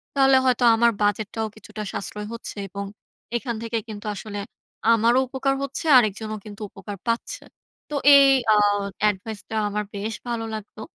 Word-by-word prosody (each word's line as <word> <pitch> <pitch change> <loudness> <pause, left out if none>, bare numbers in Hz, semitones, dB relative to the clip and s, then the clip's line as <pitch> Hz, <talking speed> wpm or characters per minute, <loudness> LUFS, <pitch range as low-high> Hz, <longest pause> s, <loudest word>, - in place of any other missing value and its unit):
তাহলে 270 -1 +5
হয়তো 250 -1 +2
আমার 235 +1 +4
বাজেটটাও 210 +2 0
কিছুটা 215 0 -8
সাশ্রয় 210 +2 -5
হচ্ছে 230 - -8
এবং 200 +1 -5 0.5
এখান 235 -1 -4
থেকে 230 0 -2
কিন্তু 215 0 -8
আসলে 205 0 -6 0.5
আমারও 230 +3 +4
উপকার 270 +1 0
হচ্ছে। 275 +4 -5
আরেকজনও 215 -1 0
কিন্তু 210 0 -10
উপকার 205 0 -8
পাচ্ছে। 230 0 -2 0.5
তো 300 - -4 0.2
এই 275 0 +7 0.3
আ - - +5 0.5
এডভাইস 205 +2 -5
টা 220 - -4
আমার 210 +1 -2
বেশ 210 +3 -3
ভালো 235 -1 -2
লাগতো। 215 0 -8
220 Hz, 155 wpm, -24 LUFS, 210-235 Hz, 0.5 s, এই